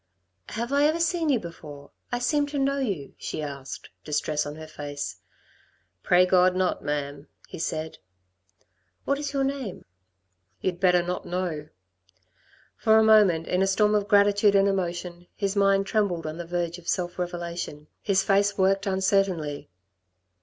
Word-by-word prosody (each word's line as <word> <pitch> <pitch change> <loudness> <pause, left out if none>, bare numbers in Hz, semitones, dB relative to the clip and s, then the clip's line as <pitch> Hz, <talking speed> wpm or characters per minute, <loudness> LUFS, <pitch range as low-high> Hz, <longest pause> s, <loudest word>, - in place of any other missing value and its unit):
"Have 235 +4 -3
I 285 +1 +4
ever 310 +2 +2
seen 335 -1 +1
you 260 -5 +3
before? 150 -5 -10 0.2
I 245 - 0
seem 290 +4 +1
to 290 0 -4
know 275 0 +1
you," 195 - -3
she 155 - -4
asked, 140 -2 -7
distress 150 0 -1
on 145 - -6
her 160 0 -9
face. 145 -2 -6 0.8
"Pray 180 - +4
God 185 0 +4
not, 185 -1 0
ma'am," 145 0 -3 0.2
he - - -9
said. 160 -1 -3 1.1
"What 280 0 0
is 290 -1 -3
your 275 -1 0
name?" 270 -7 -4 0.7
"You'd 180 -2 -2
better 180 -2 +4
not 180 +1 -4
know." 170 -4 -3 1.1
For 220 0 +4
a 220 - +6
moment, 205 -7 +5
in 180 - 0
a 195 - +3
storm 210 +2 +3
of 205 -1 +1
gratitude 205 0 +4
and 195 0 +5
emotion, 175 -2 -3
his 200 -1 -2
mind 195 -1 +3
trembled 195 -6 0
on 155 +1 -5
the 175 -1 -6
verge 175 0 -2
of 170 - -17
self 175 0 -2
revelation. 170 -4 -4 0.2
His 195 -1 +2
face 200 0 +2
worked 195 +1 +2
uncertainly. 190 - 0
185 Hz, 160 wpm, -26 LUFS, 165-210 Hz, 1.1 s, a